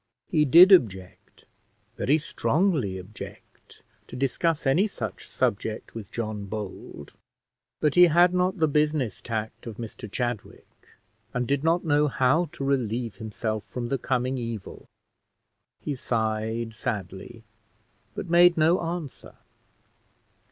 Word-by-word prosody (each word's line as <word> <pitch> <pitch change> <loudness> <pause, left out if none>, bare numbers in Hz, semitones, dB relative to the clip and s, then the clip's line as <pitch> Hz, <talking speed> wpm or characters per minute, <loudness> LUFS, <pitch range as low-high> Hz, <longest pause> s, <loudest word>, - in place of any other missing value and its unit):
He 155 -3 +3
did 170 +8 +8
object, 95 - +1 0.5
very 145 +4 +2
strongly 155 - 0
object, 95 +3 -12 0.2
to - - -9
discuss 145 +5 0
any 165 +10 +3
such 200 - -6
subject 110 +2 -2
with 110 -4 -8
John 110 -3 -4
Bold; 100 -8 -7 0.7
but 150 -2 +2
he 180 0 +8
had 175 +2 +4
not 180 +2 +1
the 160 -2 +3
business 150 -4 0
tact 110 0 -5
of 110 -2 -7
Mr 110 -3 -8
Chadwick, 120 -3 -4 0.7
and 125 -1 -1
did 140 0 0
not 170 +2 +2
know 150 -1 +3
how 135 +5 +2
to - - -6
relieve 120 -4 -1
himself 110 -1 -4
from 120 -1 -4
the 135 - -1
coming 130 +1 -1
evil; 115 -4 -6 1.0
he 150 - -3
sighed 110 -2 -2
sadly, 105 +1 -5 0.7
but - - -5
made 175 0 +5
no 160 +3 +3
answer. 165 -4 -6
125 Hz, 125 wpm, -26 LUFS, 110-160 Hz, 1.0 s, did